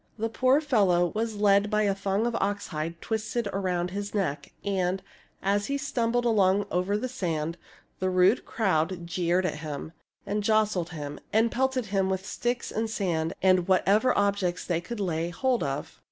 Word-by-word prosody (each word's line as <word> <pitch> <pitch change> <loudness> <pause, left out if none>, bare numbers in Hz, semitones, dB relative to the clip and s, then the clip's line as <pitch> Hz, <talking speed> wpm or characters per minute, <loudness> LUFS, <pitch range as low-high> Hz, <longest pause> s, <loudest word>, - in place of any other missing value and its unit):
The 225 +1 -1
poor 260 +4 +3
fellow 195 - +3
was 220 0 -2
led 205 0 +4
by 215 0 +2
a 200 -1 +2
thong 195 +2 -1
of 240 - 0
oxhide 170 -5 -2
twisted 225 +1 -2
around 180 -2 -1
his 205 +2 -4
neck; 150 -8 -2
and, 190 -1 0 0.4
as 205 +1 +1
he 280 - 0
stumbled 245 -3 0
along 200 -3 +3
over 185 +3 +1
the 255 - -2
sand, 170 -10 -2 0.4
the 185 - 0
rude 185 +4 +4
crowd 180 -4 0
jeered 175 +1 +1
at 165 - -1
him 155 0 -6 0.3
and 205 +1 -1
jostled 210 -5 +2
him 145 -4 -6
and 225 +2 +3
pelted 265 -1 0
him 195 -1 +2
with 190 0 -2
sticks 240 0 -2
and 220 +1 -1
sand 170 -7 -1
and 185 -2 +4
whatever 200 +6 +3
objects 200 -3 0
they 170 -2 0
could 235 +6 -6
lay 170 -3 -1
hold 250 +7 0
of. 140 -1 -4
195 Hz, 170 wpm, -27 LUFS, 175-220 Hz, 0.4 s, led